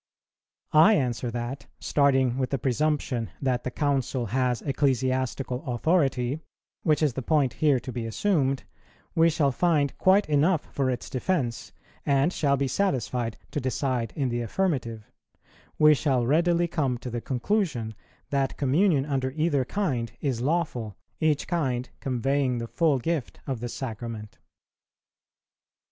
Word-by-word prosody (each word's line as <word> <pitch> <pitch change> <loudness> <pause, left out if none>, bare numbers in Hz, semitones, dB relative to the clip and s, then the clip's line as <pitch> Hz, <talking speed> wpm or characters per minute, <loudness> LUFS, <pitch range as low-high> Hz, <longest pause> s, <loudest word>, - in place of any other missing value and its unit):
I 165 +8 +7
answer 125 - -1
that, 120 +3 -5
starting 135 -3 +2
with 130 - 0
the 135 - 0
presumption 135 -3 0
that 130 -3 0
the - - -2
Council 135 -2 -1
has 125 +2 0
ecclesiastical 130 -2 0
authority, 135 -1 +1 0.4
which 155 -1 +2
is 145 -5 +2
the 130 - -3
point 140 -1 +2
here 145 -4 +3
to 130 - -6
be 120 -2 -4
assumed, 135 - +1 0.5
we 165 0 +5
shall 150 -3 +2
find 150 -1 +1
quite 195 +2 +4
enough 155 +3 +2
for 135 -2 0
its 125 -1 -3
defence, 130 -4 -2 0.3
and 140 +5 +2
shall 140 -2 +2
be 140 0 0
satisfied 125 - -1
to 145 - -2
decide 125 -3 -1
in 135 -3 0
the 120 0 -1
affirmative; 120 - -2 0.7
we 150 0 +7
shall 135 -4 +1
readily 170 +5 +3
come 140 -7 -1
to 125 +1 -7
the 120 0 -3
conclusion 130 - -1 0.4
that 135 -2 0
Communion 145 +1 +2
under 135 -3 -1
either 150 -1 +1
kind 125 - -2
is 130 -5 -1
lawful, 130 - -1 0.2
each 155 -2 +1
kind 130 -8 -1
conveying 130 0 0
the 115 - -3
full 155 +3 +2
gift 150 0 -3
of 130 -4 -3
the 120 +1 -4
Sacrament. 115 -3 -6
135 Hz, 140 wpm, -26 LUFS, 125-150 Hz, 0.7 s, I